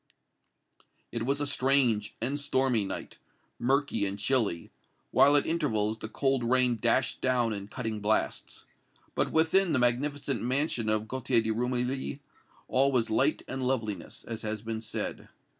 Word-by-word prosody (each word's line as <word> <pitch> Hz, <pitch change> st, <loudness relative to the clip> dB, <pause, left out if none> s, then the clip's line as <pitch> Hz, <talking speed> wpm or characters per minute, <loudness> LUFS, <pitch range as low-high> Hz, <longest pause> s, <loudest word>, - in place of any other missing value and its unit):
It 115 Hz, 0 st, -3 dB
was 140 Hz, +1 st, +1 dB
a 145 Hz, -, 0 dB
strange 130 Hz, -6 st, +2 dB
and 135 Hz, +6 st, -1 dB
stormy 130 Hz, -6 st, +1 dB
night -, -, -6 dB, 0.4 s
murky 130 Hz, -4 st, +1 dB
and 100 Hz, +1 st, -3 dB
chilly 105 Hz, -6 st, 0 dB, 0.4 s
while 145 Hz, +1 st, +5 dB
at 145 Hz, -, +4 dB
intervals 110 Hz, -10 st, 0 dB
the 110 Hz, -, -6 dB
cold 135 Hz, +2 st, 0 dB
rain 125 Hz, 0 st, +3 dB
dashed 120 Hz, +3 st, +1 dB
down 125 Hz, -3 st, +1 dB
in 100 Hz, -1 st, -6 dB
cutting 110 Hz, -2 st, -4 dB
blasts. 105 Hz, +1 st, -1 dB, 0.5 s
But -, -, 0 dB
within 165 Hz, +2 st, +3 dB
the -, -, +3 dB
magnificent 135 Hz, +3 st, 0 dB
mansion 125 Hz, -2 st, 0 dB
of 110 Hz, 0 st, 0 dB
Gaultier 125 Hz, -1 st, +1 dB
de 110 Hz, -, -1 dB
Rumilly 125 Hz, +4 st, -2 dB, 0.5 s
all 135 Hz, +2 st, +3 dB
was 120 Hz, -4 st, +1 dB
light 135 Hz, +7 st, +2 dB
and 130 Hz, 0 st, -4 dB
loveliness, 110 Hz, -8 st, -3 dB
as 115 Hz, -1 st, -6 dB
has 110 Hz, -1 st, -4 dB
been 110 Hz, -1 st, -4 dB
said. 110 Hz, -, -4 dB
125 Hz, 150 wpm, -29 LUFS, 110-135 Hz, 0.5 s, while